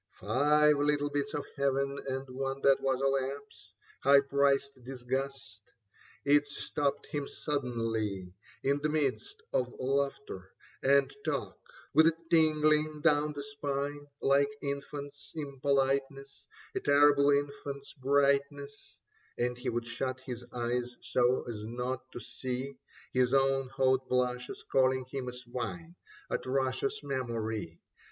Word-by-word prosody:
Five 150 +7 +4
little 145 0 +1
bits 145 0 -2
of 145 - -3
Heaven 140 0 0
and 135 0 -3
one 135 +1 -3
that 135 -1 +4
was 135 -1 +1
a 135 - 0
lapse, 135 -5 -2 0.3
High 140 +1 +7
priced 140 -1 +1
disgust: 130 -2 -4 0.6
it 145 +1 +4
stopped 145 0 -2
him 145 -1 -4
suddenly 115 - -2 0.3
In 140 +1 +2
the 150 +1 0
midst 155 - -1
of 125 -1 +1
laughter 135 -7 -2 0.3
and 140 +1 +4
talk - - -2 0.4
with 160 +1 +7
a 165 - +3 0.2
tingling 155 -1 +3
down 150 0 +3
the 145 -1 -5
spine 145 0 -3
(Like 140 +1 +4
infants' 140 0 -5
impoliteness, 140 -1 -1 0.3
a - - -1
terrible 145 0 +5
infant's 140 -1 -1
brightness), 140 +1 0 0.4
And 125 0 0
he 125 +2 -3
would 120 0 -2
shut 130 +2 -3
his 125 -2 -6
eyes 120 0 -2
so 125 +1 +2
as 110 -3 -5
not 125 +2 -4
to - - -5
see 130 +3 -5 0.4
His 125 +1 +3
own 135 0 +3
hot 130 0 +1
blushes 125 0 -1
calling 130 -1 +3
him 135 -2 -4
a - - -2
swine. 125 +8 -6 0.3
Atrocious 130 +1 -1
memory 115 - -3
135 Hz, 125 wpm, -31 LUFS, 125-145 Hz, 0.6 s, High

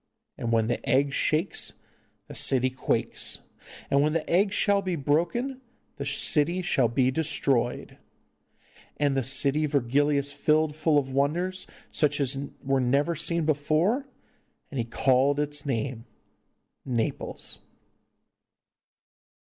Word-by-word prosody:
And 115 - -3
when 115 -1 +3
the 120 - -2
egg 140 +2 +2
shakes 155 +4 0 0.5
the - - -9
city 130 -1 +2
quakes, 130 - -2 0.5
and 140 - +4
when 150 +1 +2
the 165 -1 -1
egg 195 +4 +2
shall 200 0 +2
be 185 -2 -2
broken 170 - -1 0.4
the 140 -1 -4
city 160 +5 +1
shall 135 -9 +2
be 130 +2 +1
destroyed. 135 -5 0 1.0
And 145 -2 +1
the 135 - +2
city 140 +4 +1
Virgilius 140 +1 +1
filled 155 0 +1
full 155 -1 +2
of 135 -2 0
wonders, 170 +8 -1 0.2
such 150 -1 +1
as 135 -1 +1 0.3
never 135 +3 +1
were - - -2
seen 170 +1 -1
before, 155 - +1 0.6
and 140 - -4
he 115 - -1
called 135 +4 +2
its 145 0 -3
name 120 -2 -2 0.8
Naples. 120 -4 -2
145 Hz, 125 wpm, -27 LUFS, 130-160 Hz, 1.0 s, and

